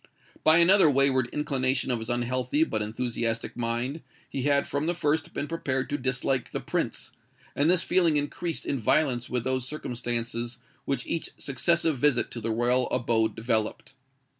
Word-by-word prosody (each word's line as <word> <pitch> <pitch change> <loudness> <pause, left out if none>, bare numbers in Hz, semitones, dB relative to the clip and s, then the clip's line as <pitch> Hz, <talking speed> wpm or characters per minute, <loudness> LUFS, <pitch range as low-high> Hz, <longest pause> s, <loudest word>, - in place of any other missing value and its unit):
By 155 +1 +6
another 175 0 +6
wayward 135 -2 +3
inclination 130 -3 0
of 120 - 0
his 110 +2 -6
unhealthy 125 +4 0
but 110 -8 -2
enthusiastic 115 +1 -2
mind, 120 +6 -2 0.3
he 135 - -4
had 140 +1 +2
from 145 +2 -2
the 175 - +1
first 155 -1 0
been 145 - -3
prepared 135 -6 -2
to 145 - 0
dislike 130 -1 -1
the - - -3
Prince; - - -3 0.4
and 145 +3 +2
this 180 -1 +4
feeling 175 -4 +3
increased 155 +3 -3
in 140 - -1
violence 125 +1 +1
with 125 -2 -1
those 130 0 -1
circumstances 120 -3 -2 0.3
which 135 -3 -2
each 165 - -2
successive 160 +2 +1
visit 140 -3 +2
to 120 - -6
the 115 - -2
royal 120 +3 +1
abode 115 -3 +1
developed. 110 -1 -2
130 Hz, 165 wpm, -27 LUFS, 120-150 Hz, 0.4 s, By